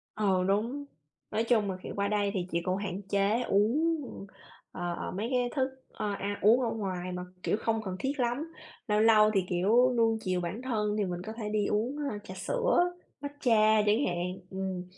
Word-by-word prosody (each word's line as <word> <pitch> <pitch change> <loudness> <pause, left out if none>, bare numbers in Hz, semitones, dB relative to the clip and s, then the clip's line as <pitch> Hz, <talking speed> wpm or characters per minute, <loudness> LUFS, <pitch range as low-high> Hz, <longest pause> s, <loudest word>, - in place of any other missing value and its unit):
Ờ, 195 -4 +2
đúng. 235 +9 0 0.5
Nói 220 +2 +1
chung 220 -4 +2
là, 185 - -5
kiểu, - - -6
qua 200 0 0
đây 205 -1 +1
thì 180 -2 -2
chị 170 0 0
cũng 185 +1 0
hạn 200 -1 -4
chế, 200 +3 +1
uống, 285 +12 +2 0.7
ờ, 175 -1 -3
ờ, - - -5
mấy 205 +5 -3
cái 245 -1 +1
thức 265 -1 +1 0.2
ơ, 210 -1 -2
ăn 200 +1 -3
uống 230 +5 +6
ở 235 - +1
ngoài 185 -4 -3
mà, 180 0 -4 0.2
kiểu, - - +1
không 225 -1 0
cần 185 -2 -4
thiết 275 +1 -2
lắm. 255 +7 -1 0.3
Lâu 210 0 +2
lâu 215 -1 +6
thì, 190 -2 +2
kiểu, 225 +8 +4
nuông 225 -1 +3
chiều 185 -2 -1
bản 180 +7 -4
thân 210 -5 -1
thì 205 - +1
mình 175 -1 -4
có 220 +4 -6
thể 215 -2 -5
đi 210 -1 +1
uống, 225 +8 0 0.2
a, 205 - -4
trà 185 - -9
sữa, 415 - +1 0.3
matcha 225 -7 +3
chẳng 215 +7 +3
hạn, 180 +1 -2
ừm. 190 -1 -3
210 Hz, 205 wpm, -30 LUFS, 190-235 Hz, 0.7 s, uống